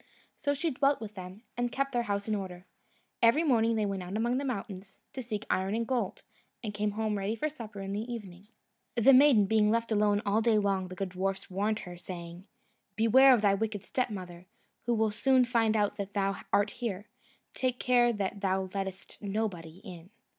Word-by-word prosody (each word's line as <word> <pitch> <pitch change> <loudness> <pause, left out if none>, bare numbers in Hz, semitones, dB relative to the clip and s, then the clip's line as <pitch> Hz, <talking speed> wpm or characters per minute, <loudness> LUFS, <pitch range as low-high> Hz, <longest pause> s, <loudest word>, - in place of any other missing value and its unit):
So 285 0 -1
she 320 +3 -1
dwelt 275 +2 +2
with 215 -2 -7
them, 185 +3 -9
and 245 0 -1
kept 275 +2 -1
their 240 -2 +1
house 200 +1 -1
in 215 - 0
order. 185 -3 -5 0.6
Every 235 +8 +5
morning 230 -6 +3
they 215 -1 +1
went 195 -2 -2
out 180 +3 -4
among 240 +3 +1
the - - -3
mountains, 195 -6 -5 0.2
to 260 - -5
seek 220 -3 -5
iron 190 +3 0
and 230 0 -1
gold, 260 - -2 0.4
and 210 -2 -4
came 210 0 -1
home 215 -1 -1
ready 200 +3 -1
for 305 +7 -1
supper 220 -8 -9
in 195 0 -4
the 220 +4 -4
evening. 200 -4 -8 0.5
The 240 +4 +6
maiden 255 -6 +6
being 210 +1 +3
left 230 +1 0
alone 210 -1 +2
all 205 +2 +2
day 225 -1 +3
long, 195 -2 0
the 185 - -8
good 195 +1 -3
dwarfs 190 +1 -3
warned 210 +3 -1
her, 175 -1 -9
saying, 175 +1 -8 0.5
"Beware 240 +5 +6
of 240 -4 +4
thy 200 -1 +5
wicked 210 -1 -2
stepmother, 185 -8 -4 0.4
who 240 - +2
will 220 -1 +2
soon 255 +4 +3
find 225 -3 +2
out 205 -1 0
that 200 0 -5
thou 195 0 0
art 205 0 +3
here; 210 -4 -5 0.5
take 255 -1 -1
care 245 -1 +4
that 200 -2 -3
thou 190 -1 0
lettest 190 -1 -6
nobody 195 -5 -4
in." 180 -2 -10
210 Hz, 200 wpm, -30 LUFS, 195-235 Hz, 0.6 s, The